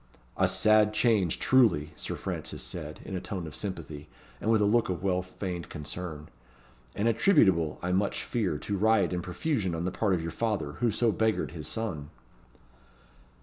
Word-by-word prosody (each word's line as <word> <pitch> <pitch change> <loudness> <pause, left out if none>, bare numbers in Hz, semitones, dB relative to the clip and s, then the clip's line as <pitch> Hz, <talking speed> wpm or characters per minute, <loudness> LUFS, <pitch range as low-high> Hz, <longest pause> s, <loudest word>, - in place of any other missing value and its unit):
"A 95 - +3
sad 105 +3 +4
change, 105 -7 +2
truly," 100 - +3
Sir - - -5
Francis - - -5
said, - - -7
in 95 - -5
a 90 - -3
tone 95 -4 -5
of 75 - -7
sympathy, 80 -7 -6 0.3
and 110 - -1
with 110 -1 +4
a 105 - +3
look 115 +2 +3
of 90 0 -3
well 90 -2 +1
feigned 90 -1 -6
concern; 75 0 -6 0.7
"and 105 - 0
attributable, 95 - +4
I 90 - 0
much 100 +2 0
fear, 100 -10 -1
to 100 +7 -3
riot 110 -2 +3
and 90 - -1
profusion 95 - -1
on 85 +1 -3
the 90 - -1
part 100 -2 +1
of 85 - -2
your 85 - -3
father, 105 -6 -1
who 120 - +2
so 115 +1 +2
beggared 110 0 0
his 80 -3 -7
son." 85 -11 -4
95 Hz, 180 wpm, -29 LUFS, 85-110 Hz, 0.7 s, sad